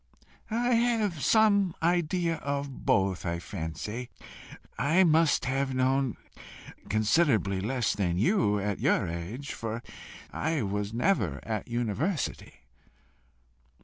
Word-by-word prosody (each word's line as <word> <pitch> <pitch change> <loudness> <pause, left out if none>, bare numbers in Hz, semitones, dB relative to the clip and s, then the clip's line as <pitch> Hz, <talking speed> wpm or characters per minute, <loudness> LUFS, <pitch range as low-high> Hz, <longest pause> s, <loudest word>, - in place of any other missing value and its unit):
"I 240 +2 +1
have 225 -8 +1
some 200 - +4
idea 170 0 +1
of 140 -2 -4
both, 95 -2 +2
I 85 -1 -2
fancy. 95 - -5 0.7
I 150 +10 +3
must 160 -2 +3
have 135 +1 -1
known 130 -1 +1 0.7
considerably 110 - +2
less 120 +2 0
than 90 -4 -1
you 105 - +2
at 100 0 -2
your - - +2
age, 90 +12 -5
for 115 +1 -5 0.5
I 160 -3 -1
was 100 +1 -2
never 115 - 0
at 110 -2 -3
a - - -16
university." 120 - -2
130 Hz, 115 wpm, -28 LUFS, 105-165 Hz, 0.7 s, some